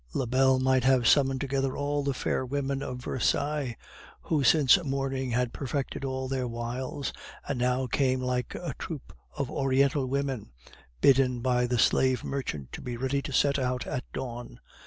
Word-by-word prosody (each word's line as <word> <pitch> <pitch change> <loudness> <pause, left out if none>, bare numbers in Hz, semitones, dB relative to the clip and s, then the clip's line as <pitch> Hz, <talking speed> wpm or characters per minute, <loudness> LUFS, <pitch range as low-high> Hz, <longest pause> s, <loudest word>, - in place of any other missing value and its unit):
Lebel 130 +1 +3
might 130 -1 +2
have 130 -2 +4
summoned 135 -1 +4
together 135 -1 -1
all 145 0 -1
the 140 -1 -1
fair 130 - -1
women 135 +1 -2
of 125 -3 -4
Versailles, 140 -1 0 0.5
who 150 -3 +1
since 145 +4 +5
morning 135 -2 -2
had 125 0 0
perfected 140 0 -3
all 130 -1 -2
their 130 -1 -1
wiles, 120 +4 -4 0.3
and 140 -3 -2
now 125 +1 +1
came 130 +1 +1
like 125 -1 -2
a - - -4
troupe - - -7 0.2
of 140 - -2
Oriental 135 0 +2
women, 135 - -2 0.5
bidden 130 -2 +4
by 125 -1 +2
the 125 0 0
slave 130 +1 +3
merchant 75 - -4
to - - -7
be 120 -1 -5
ready 135 +3 0
to 140 - -6
set 140 +2 +3
out 125 -1 -1
at 125 - -3
dawn. 120 -2 -6
130 Hz, 165 wpm, -28 LUFS, 125-140 Hz, 0.5 s, since